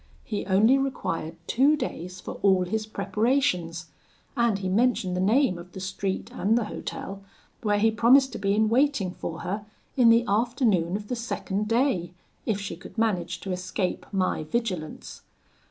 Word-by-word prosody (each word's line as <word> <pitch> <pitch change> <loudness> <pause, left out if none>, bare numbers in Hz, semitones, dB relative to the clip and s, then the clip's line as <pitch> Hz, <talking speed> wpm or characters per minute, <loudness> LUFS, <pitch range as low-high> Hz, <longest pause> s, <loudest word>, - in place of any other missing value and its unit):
He 210 -2 -4
only 220 +8 +5
required 165 -12 -3
two 275 - +4
days 180 - -5
for - - -7
all 190 -2 +4
his 215 +3 -2
preparations, 195 -5 0 0.4
and 235 -4 +2
he 195 -1 -4
mentioned 200 -2 +1
the 180 - 0
name 215 -1 +3
of 175 +1 -12
the 190 - -7
street 190 0 -3
and 215 +4 +2
the 240 - +1
hotel, 200 -1 -6 0.4
where 210 -3 +2
he 220 +2 +3
promised 250 +4 +5
to - - -6
be 200 0 +1
in 215 +1 +3
waiting 245 -5 +2
for 165 -2 -6
her 200 +3 -3 0.3
in 245 -3 +6
the 230 +1 +5
afternoon 210 -5 +1
of 205 0 -5
the 250 - -2
second 210 -3 -3
day, 220 -8 +1 0.3
if 210 -3 +1
she 195 -4 -5
could 180 - -13
manage 210 -6 0
to 195 - -4
escape 185 +1 -3
my 185 -5 0
vigilance. 180 -3 -4
205 Hz, 170 wpm, -26 LUFS, 185-235 Hz, 0.4 s, in